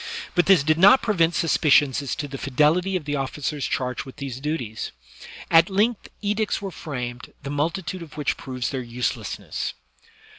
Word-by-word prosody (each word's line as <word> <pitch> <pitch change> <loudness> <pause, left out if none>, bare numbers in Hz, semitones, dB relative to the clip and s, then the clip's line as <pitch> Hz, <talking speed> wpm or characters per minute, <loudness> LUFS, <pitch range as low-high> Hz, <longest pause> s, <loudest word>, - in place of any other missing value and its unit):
but 175 - +2
this 190 -7 +6
did 155 +2 +2
not 200 +8 +7
prevent 170 -6 +2
suspicions 145 -5 +3
as 140 - -3
to 145 - -4
the 135 -1 -7
fidelity 155 +8 +2
of 175 -5 -2
the 145 0 -1
officers 140 +1 -2
charged 125 -1 -2
with 130 - -11
these 135 -3 -6
duties. 135 -7 -3 0.6
At 165 +2 +6
length 210 +4 +1
edicts 210 +1 0
were 195 -1 -5
framed, 125 -7 -6
the 140 - -4
multitude 165 +4 -2
of 155 -2 -11
which 150 - 0
proves 125 -2 -4
their 135 -2 -2
uselessness. 120 0 -3
150 Hz, 170 wpm, -24 LUFS, 135-180 Hz, 0.6 s, not